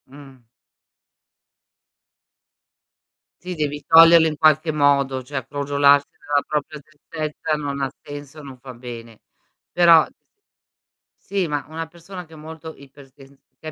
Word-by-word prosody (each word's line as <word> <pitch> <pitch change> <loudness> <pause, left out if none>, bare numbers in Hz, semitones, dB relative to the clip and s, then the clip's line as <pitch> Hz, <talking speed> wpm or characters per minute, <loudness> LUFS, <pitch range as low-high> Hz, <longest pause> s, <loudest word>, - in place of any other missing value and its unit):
Mh. 135 -1 -15 3.0
Sì 180 0 -7
devi 150 -2 -3
toglierlo 165 0 +7
in 155 -1 -4
qualche 155 +1 +3
modo, 140 -3 +1
cioè 135 -1 -6
crogiolarsi 140 0 +2
nella 145 -1 -2
propria 150 0 -4
tristezza 155 +1 -6
non 140 -2 -4
ha 135 -1 -2
senso, 145 +1 -10
non 135 -2 -11
fa 130 +1 -11
bene. 115 -2 -10 0.5
Però 170 -2 +6 1.1
Sì, 195 -3 -3
ma 145 -2 -3
una 160 +1 -6
persona 175 +2 -11
che 160 - -19
è - - -12
molto 160 +1 -10
ipersen 140 0 -18 0.2
che 160 - -11
145 Hz, 125 wpm, -21 LUFS, 140-160 Hz, 3.0 s, toglierlo